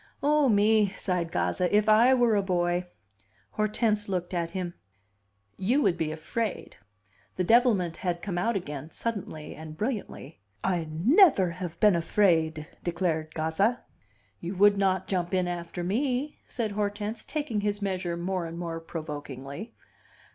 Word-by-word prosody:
"Oh, 295 -1 +4
me!" 210 0 +4
sighed 175 -3 -1
Gazza. 180 0 0
"If 210 0 +2
I 230 +5 +6
were 240 -3 +3
a 200 - +3
boy!" 175 -1 0 0.6
Hortense 215 -1 0
looked 180 -1 -2
at 170 -2 -1
him. 180 -1 -4 0.8
"You 245 +10 +2
would 170 - +3
be 155 -1 -2
afraid." 205 +8 -4 0.6
The 185 - 0
devilment 210 -6 +3
had 175 -2 -2
come 180 -4 -2
out 230 +5 0
again, 150 -5 -5
suddenly 175 -7 -5
and 155 0 -9
brilliantly: 210 - -4 0.2
"I 175 -4 0
never 200 - +5
have 170 -1 -6
been 210 -4 +5
afraid!" 160 -3 +2 0.2
declared 165 -3 -1
Gazza. 180 +10 +1 0.6
"You 175 +3 -5
would 205 +2 +6
not 190 -2 +1
jump 180 -1 -1
in 180 -1 +1
after 175 0 -4
me," 255 +8 -1
said 225 -3 -2
Hortense, 205 +1 -3
taking 290 -9 -2
his 205 0 -1
measure 185 -4 -2
more 180 0 -2
and 165 +1 -7
more 165 -1 -4
provokingly. 150 - -7
185 Hz, 145 wpm, -28 LUFS, 170-215 Hz, 0.8 s, I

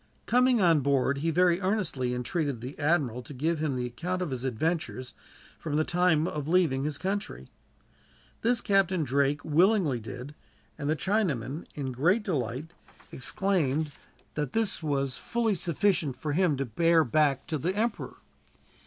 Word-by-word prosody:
Coming 250 0 +4
on 170 -5 +5
board, 140 0 +1
he 165 +3 0
very 175 +2 +3
earnestly 170 - 0
entreated 135 +1 -2
the 125 +5 -7
admiral 145 -6 +1
to 135 +3 -11
give 160 +5 0
him 150 -4 -1
the 125 -1 -2
account 175 +9 -3
of 165 - -4
his 130 -1 -4
adventures, 130 -1 -2 0.5
from 150 -3 -3
the 155 - +3
time 175 -2 +2
of 150 -3 -4
leaving 160 -6 +2
his 150 -1 -2
country. 200 +4 -4 0.9
This 235 +1 +2
Captain 190 -4 +2
Drake 140 +1 0
willingly 165 - +3
did; 125 +5 -8 0.4
and 145 -1 -4
the 155 - +2
Chinaman, 160 - -1
in 135 -3 -3
great 175 - +2
delight, 145 - -3 0.4
exclaimed 155 -1 0 0.4
that 150 -4 -3
this 225 -5 0
was 140 -4 -1
fully 235 -2 0
sufficient 170 -4 0
for 150 -2 -3
him 170 -3 +2
to 135 - -1
bear 165 +7 +3
back 145 +1 +1
to 155 -2 -3
the 180 +8 -1
emperor. 225 +2 -2
155 Hz, 155 wpm, -28 LUFS, 135-180 Hz, 0.9 s, on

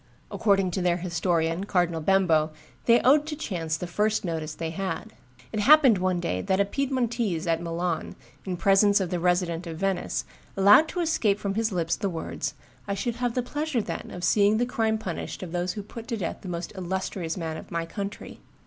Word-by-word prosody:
According 195 -3 +2
to 185 - -2
their 175 -1 +2
historian, 170 0 0
Cardinal 175 -4 +1
Bembo, 165 -3 +3 0.4
they 235 0 +6
owed 290 +4 +4
to 305 - -3
chance 170 - -3
the 180 - -5
first 210 +4 0
notice 160 -2 -3
they 165 -1 -4
had. 165 -1 -4 0.4
It 215 - -1
happened 265 -3 +6
one 185 -1 +1
day 95 - -2
that 190 - 0
a 200 - +4
Piedmontese 235 - -1
at 165 -1 +1
Milan, 170 0 -2 0.3
in 185 -2 -3
presence 200 +3 +4
of 185 -3 -2
the 180 - 0
Resident 175 -1 0
of 165 -1 -6
Venice, 195 0 -1 0.3
allowed 205 +11 +7
to 355 - -3
escape 315 -12 +2
from 200 -1 -2
his 220 +1 0
lips 170 -2 0
the 200 - -2
words, 165 -3 -4 0.3
"I 200 - -1
should 235 +4 -2
have 245 -1 -1
the 250 - +1
pleasure, 295 0 -2
then, 215 - -4
of 180 - -7
seeing 205 +4 +4
the 245 - +2
crime 220 -2 0
punished 185 -3 -5
of 175 - -7
those 175 +1 -1
who 210 - -6
put 230 +3 -9
to 230 - -2
death 180 -5 -3
the 185 - -7
most 170 0 -5
illustrious 185 -2 -3
man 160 -2 -3
of - - -10
my 170 0 -2
country." 200 +4 -6
190 Hz, 205 wpm, -26 LUFS, 170-220 Hz, 0.4 s, allowed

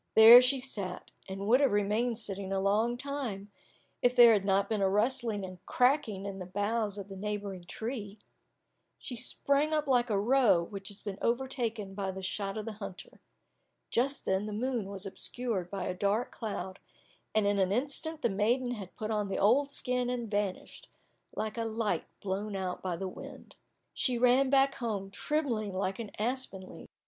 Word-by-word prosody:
There 225 +3 +11
she 255 +2 +2
sat, 200 -8 -5 0.2
and 195 +1 -5
would 245 +4 +5
have 275 - +4
remained 210 +4 +1
sitting 195 -3 -4
a 195 - 0
long 215 +5 +1
time, 245 -8 -5 0.5
if 245 0 +3
there 240 -2 +9
had 205 -3 +2
not 195 0 +2
been 215 -2 -1
a 195 - +3
rustling 220 0 +1
and 185 -1 -11
cracking 250 -7 +1
in 195 -1 -5
the 180 - -6
boughs 205 +2 -1
of 200 -1 -6
the 195 - -9
neighbouring 200 -2 -5
tree. 220 +1 -5 0.8
She 250 - -7
sprang 280 +5 +1
up 305 -1 +1
like 250 -3 +2
a 205 -2 +1
roe 230 -5 +4
which 195 +2 -7
has 205 0 -6
been 200 -2 -6
overtaken 235 -5 -1
by 195 -1 -3
the 190 0 -6
shot 195 +2 -2
of 215 - -4
the 225 - -4
hunter. 200 -3 -9 0.7
Just 275 +4 +1
then 190 +2 0
the 210 - -5
moon 240 0 -1
was 200 0 -6
obscured 195 -1 -2
by 195 -1 -4
a - - -2
dark 200 +6 0
cloud, 200 -4 -5 0.6
and 215 -1 +3
in 200 0 +2
an 190 -1 +2
instant 290 +7 -2
the 235 - +3
maiden 240 +6 +1
had 200 -6 -7
put 215 0 -4
on 210 -2 0
the 195 - -3
old 265 +8 +3
skin 250 -3 -1
and 240 -3 -3
vanished, 205 -2 -3 0.5
like 215 +1 -3
a - - 0
light 225 -1 -1 0.2
blown 200 +1 -3
out 185 -2 -3
by 185 -2 -2
the 190 +3 -4
wind. 185 - -10 0.4
She 250 -2 +1
ran 250 +2 +4
back 275 0 +4
home, 205 -6 -4
trembling 235 -5 -1
like 190 +1 -2
an 225 -3 -5
aspen 220 -5 -3
leaf. - - -11
215 Hz, 185 wpm, -31 LUFS, 195-245 Hz, 0.8 s, There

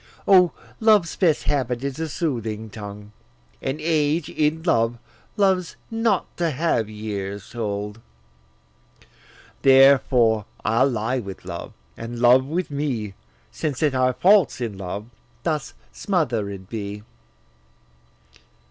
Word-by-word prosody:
O, 180 -3 +6 0.3
love's 210 -7 +4
best 165 -6 +2
habit 125 -3 -1
is 140 +1 -4
a 160 -1 -2
soothing 110 - -3
tongue, 105 0 -9 0.5
And 135 +3 -3
age, 155 0 +1
in 155 +1 0
love, 115 -7 +2 0.4
loves 190 -4 +2 0.2
not 225 -4 +1
to 170 -1 +1
have 140 -7 0
years 100 -2 -5
told. 105 -2 -4 1.6
Therefore, 130 -5 +5 0.2
I'll 115 +5 +3
lie 120 +2 -1
with 100 -5 -8
love, - - -7 0.2
and 115 +1 -7
love 125 +2 +6
with 170 +2 -2
me, 130 -8 -2 0.4
Since 150 -2 -3
that 150 -3 +2
our 130 0 +2
faults 185 +4 +4
in 115 -5 -3
love 95 +2 -5 0.4
thus 155 -3 -2 0.2
smother'd 115 - -2
be. 105 -1 -6
130 Hz, 115 wpm, -23 LUFS, 110-160 Hz, 1.6 s, O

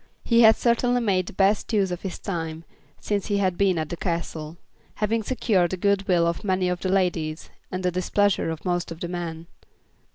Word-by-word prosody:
He 235 0 +4
had 220 -1 +8
certainly 245 +1 +2
made 190 -6 +1
the - - -7
best 200 +4 +2
use 195 -3 +2
of 180 - -4
his 190 - -5
time 165 -3 -4 0.4
since 205 -2 -2
he 205 - +1
had 190 -3 +1
been 190 -1 +2
at 155 -1 -2
the - - -3
Castle, 165 -2 -4 0.4
having 220 +2 0
secured 205 -6 +1
the 185 - -3
good 200 +1 +1
will 175 -2 +3
of 170 0 -1
many 185 -2 +1
of 180 0 -2
the 185 - -2
ladies, 175 -5 -1 0.2
and 185 0 -4
the 180 - +1
displeasure 190 +1 +1
of 160 +2 -6
most 175 -1 -1
of 165 - -7
the 175 - -3
men. 170 -2 -5
185 Hz, 205 wpm, -24 LUFS, 170-200 Hz, 0.4 s, had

